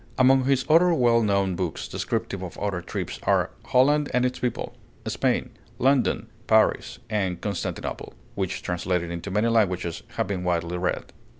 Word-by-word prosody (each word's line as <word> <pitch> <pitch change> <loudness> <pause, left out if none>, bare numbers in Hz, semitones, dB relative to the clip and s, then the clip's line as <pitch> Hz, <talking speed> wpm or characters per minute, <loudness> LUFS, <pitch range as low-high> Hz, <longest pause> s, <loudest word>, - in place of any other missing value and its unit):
Among 130 0 +5
his 135 -1 +2
other 170 +2 +5
well 120 -4 +4
known 100 -3 +1
books, 85 -2 -3
descriptive 100 - -3
of 90 -2 -7
other 100 -3 -2
trips, - - -5
are - - +2
'Holland 145 +3 +3
and 125 0 +3
Its 125 0 -2
People,' 125 -2 -3 0.3
'Spain,' - - 0 0.3
'London,' 135 0 +2 0.2
'Paris,' - - +3
and 95 -5 -1
'Constantinople,' 100 -4 -4 0.2
which, - - -3
translated 90 -1 -1
into 85 +3 -5
many 105 +4 +1
languages, 90 -7 +1
have - - 0
been 95 -2 -3
widely 85 0 -1
read. 90 0 -2
100 Hz, 155 wpm, -25 LUFS, 90-125 Hz, 0.3 s, Among